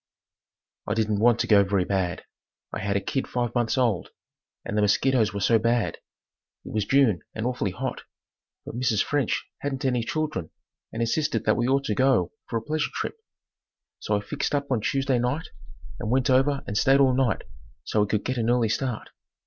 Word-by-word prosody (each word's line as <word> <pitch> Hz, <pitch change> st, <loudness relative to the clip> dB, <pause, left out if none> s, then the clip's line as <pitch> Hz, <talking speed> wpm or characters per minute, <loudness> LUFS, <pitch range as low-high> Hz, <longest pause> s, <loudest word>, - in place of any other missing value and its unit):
I 105 Hz, -, 0 dB
didn't 110 Hz, -2 st, 0 dB
want 120 Hz, +1 st, +4 dB
to -, -, 0 dB
go 100 Hz, -2 st, +6 dB
very 95 Hz, -2 st, +1 dB
bad. 95 Hz, -3 st, -1 dB, 0.5 s
I -, -, -3 dB
had 100 Hz, 0 st, 0 dB
a -, -, -1 dB
kid 135 Hz, -, -2 dB
five 120 Hz, -2 st, -2 dB
months 120 Hz, 0 st, 0 dB
old 115 Hz, -9 st, +1 dB, 0.6 s
and -, -, -3 dB
the 105 Hz, -, +2 dB
mosquitoes 110 Hz, +2 st, +3 dB
were 100 Hz, -, -4 dB
so 115 Hz, +4 st, +4 dB
bad. 115 Hz, 0 st, 0 dB, 0.7 s
It -, -, -8 dB
was 105 Hz, -2 st, 0 dB
June 130 Hz, -9 st, +3 dB
and 110 Hz, -, -3 dB
awfully 125 Hz, -5 st, -1 dB
hot. 95 Hz, -, -4 dB, 0.6 s
But -, -, -7 dB
Mrs. 120 Hz, -4 st, +1 dB
French 145 Hz, -5 st, -1 dB
hadn't 135 Hz, -1 st, -3 dB
any 125 Hz, -3 st, +1 dB
children 120 Hz, -, -2 dB, 0.4 s
and 115 Hz, -, -2 dB
insisted 145 Hz, +6 st, 0 dB
that -, -, +3 dB
we 120 Hz, 0 st, 0 dB
ought 135 Hz, +1 st, +2 dB
to 110 Hz, -, -1 dB
go 120 Hz, -7 st, +2 dB, 0.2 s
for 115 Hz, -, -1 dB
a 110 Hz, -, -4 dB
pleasure 155 Hz, +5 st, -1 dB
trip. -, -, -4 dB, 0.8 s
So 105 Hz, -, 0 dB
I -, -, -3 dB
fixed 140 Hz, +7 st, -2 dB
up 140 Hz, -1 st, -2 dB
on 120 Hz, -4 st, +1 dB
Tuesday 135 Hz, 0 st, +1 dB
night 125 Hz, +7 st, -1 dB, 0.5 s
and 110 Hz, -, -3 dB
went 130 Hz, +2 st, +2 dB
over 135 Hz, +2 st, +3 dB
and 100 Hz, -, -5 dB
stayed 135 Hz, +6 st, +4 dB
all 135 Hz, -2 st, +5 dB
night 130 Hz, -2 st, +1 dB, 0.4 s
so 105 Hz, -, 0 dB
we 105 Hz, -, +2 dB
could 105 Hz, 0 st, -1 dB
get 130 Hz, 0 st, -1 dB
an 115 Hz, 0 st, 0 dB
early 120 Hz, -2 st, +2 dB
start. 120 Hz, +1 st, -2 dB
120 Hz, 195 wpm, -25 LUFS, 105-135 Hz, 0.8 s, go